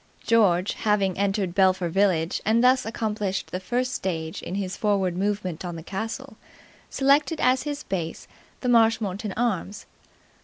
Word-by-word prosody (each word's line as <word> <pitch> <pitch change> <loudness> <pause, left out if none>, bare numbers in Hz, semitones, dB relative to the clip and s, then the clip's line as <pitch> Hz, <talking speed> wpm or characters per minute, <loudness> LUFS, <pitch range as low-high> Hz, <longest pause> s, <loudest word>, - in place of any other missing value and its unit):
George, 195 -5 +3
having 200 -3 +1
entered 195 -2 0
Belpher 185 -2 +3
village 175 -2 +1
and 225 +3 +2
thus 255 -1 +4
accomplished 210 -4 -3
the 185 - -3
first 250 +6 -1
stage 160 -6 -3
in 180 - -5
his 195 -1 -3
foreward 195 -4 0
movement 190 -3 -2
on 175 -2 -5
the 165 - -8
castle, 220 - -5 0.5
selected 285 +4 +2
as 255 +1 +3
his 290 0 -5
base 170 -4 -4 0.3
the 250 - -2
Marshmoreton 220 -4 +2
Arms. 210 -4 -2
200 Hz, 145 wpm, -25 LUFS, 185-230 Hz, 0.5 s, thus